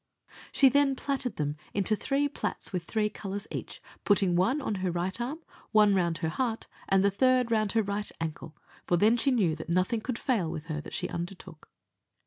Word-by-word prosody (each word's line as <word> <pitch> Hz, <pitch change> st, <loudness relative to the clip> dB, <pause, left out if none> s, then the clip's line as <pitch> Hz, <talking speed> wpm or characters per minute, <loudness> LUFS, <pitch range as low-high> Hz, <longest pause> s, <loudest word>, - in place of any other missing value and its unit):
She 275 Hz, -, +5 dB
then 275 Hz, +1 st, +3 dB
platted 265 Hz, -2 st, -2 dB
them 150 Hz, 0 st, -2 dB, 0.2 s
into 200 Hz, +2 st, +2 dB
three 275 Hz, +6 st, 0 dB
plats 285 Hz, -, -4 dB
with 180 Hz, -2 st, -2 dB
three 215 Hz, +2 st, 0 dB
colours 200 Hz, -1 st, -5 dB
in -, -, -5 dB
each, -, -, -12 dB, 0.2 s
putting 195 Hz, -3 st, +3 dB
one 195 Hz, +12 st, +2 dB
on 265 Hz, -, -2 dB
her 185 Hz, -, 0 dB
right 175 Hz, +6 st, -2 dB
arm, 295 Hz, +7 st, -4 dB, 0.3 s
one 210 Hz, -1 st, +6 dB
round 170 Hz, -4 st, +1 dB
her -, -, +1 dB
heart, 230 Hz, +5 st, -2 dB, 0.2 s
and 195 Hz, 0 st, +4 dB
the 200 Hz, -, +4 dB
third 255 Hz, +2 st, +3 dB
round 215 Hz, -3 st, +1 dB
her 225 Hz, -1 st, +3 dB
right 205 Hz, +1 st, -3 dB
ankle, 160 Hz, -1 st, -5 dB, 0.3 s
for 175 Hz, -, +3 dB
then 215 Hz, +6 st, +5 dB
she 245 Hz, +4 st, +1 dB
knew 200 Hz, -11 st, +2 dB
that 160 Hz, +1 st, -8 dB
nothing 185 Hz, +6 st, +1 dB
could 245 Hz, +1 st, -3 dB
fail 220 Hz, -, 0 dB
with 155 Hz, 0 st, -5 dB
her 155 Hz, -2 st, -4 dB
that -, -, -8 dB
she -, -, -2 dB
undertook. 175 Hz, -2 st, -7 dB
205 Hz, 205 wpm, -29 LUFS, 175-245 Hz, 0.3 s, one